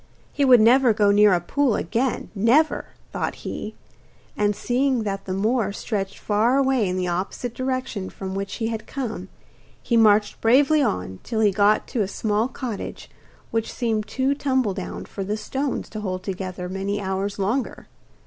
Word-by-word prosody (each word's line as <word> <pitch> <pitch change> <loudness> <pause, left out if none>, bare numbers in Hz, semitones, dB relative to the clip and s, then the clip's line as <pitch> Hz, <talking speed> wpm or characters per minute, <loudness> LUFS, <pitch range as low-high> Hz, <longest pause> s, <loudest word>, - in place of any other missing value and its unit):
He 285 - +1
would 255 -3 +7
never 245 +1 +5
go 205 -1 +4
near 205 0 +6
a 180 - +3
pool 255 +6 +1
again, 250 +1 -1
never, 235 +10 +3 0.3
thought - - -2
he; - - -5 0.6
and 205 0 +1
seeing 250 0 0
that 195 -2 -3
the 185 - -3
moor 215 +1 +1
stretched 200 -1 -3
far 220 +5 +2
away 265 -7 +2
in 180 - -2
the 180 -1 -1
opposite 190 +7 -3
direction 255 -7 -3
from 190 -1 -6
which 195 0 -4
he 225 -1 -2
had 225 -1 -5
come, 225 -9 -5 0.5
he 235 - 0
marched 210 -2 +4
bravely 280 +6 +4
on 95 - -2
till 225 -2 -2
he 210 -2 +4
got 205 +2 +3
to 235 - -1
a 200 - 0
small 210 +2 0
cottage, 245 -5 -6 0.4
which 225 -1 -1
seemed 220 -3 -1
too 265 +4 0
tumbledown 260 -10 -2
for 195 - -6
the 205 +3 -2
stones 265 +6 -3
to 215 - -6
hold 185 -2 -3
together 185 -1 -5
many 195 +2 -2
hours 195 +1 -2
longer. 215 +7 -2
215 Hz, 170 wpm, -23 LUFS, 195-250 Hz, 0.6 s, would